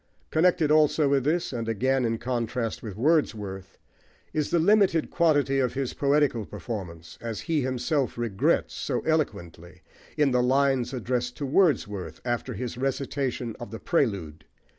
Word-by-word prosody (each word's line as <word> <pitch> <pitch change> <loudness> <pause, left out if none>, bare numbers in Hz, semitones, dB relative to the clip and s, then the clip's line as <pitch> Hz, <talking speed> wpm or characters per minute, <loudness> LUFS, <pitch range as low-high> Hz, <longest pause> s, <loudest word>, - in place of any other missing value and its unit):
Connected 160 -2 +3
also 155 -1 +4
with 135 -2 +2
this, 165 0 0
and 115 -2 -3
again 130 +4 +1
in 115 0 0
contrast 120 -1 -2
with 105 -5 -7
Wordsworth, 105 - 0 0.6
is 155 -1 0
the 175 - +2
limited 185 -1 +3
quantity 145 -5 +2
of 125 -1 0
his 135 -2 -2
poetical 140 -5 +2
performance, 90 -8 -7
as 115 -2 -4
he 160 -3 0
himself 130 +2 -1
regrets 115 -5 0
so - - -2
eloquently 90 - -3 0.3
in 145 -3 +3
the 125 0 +3
lines 130 -1 +2
addressed 125 -1 -2
to 145 - -3
Wordsworth 105 - +1
after 120 -1 -2
his 125 -1 -5
recitation 135 -3 -2
of 120 - -7
The 115 - -7
Prelude. 90 - -1
125 Hz, 145 wpm, -26 LUFS, 115-145 Hz, 0.6 s, also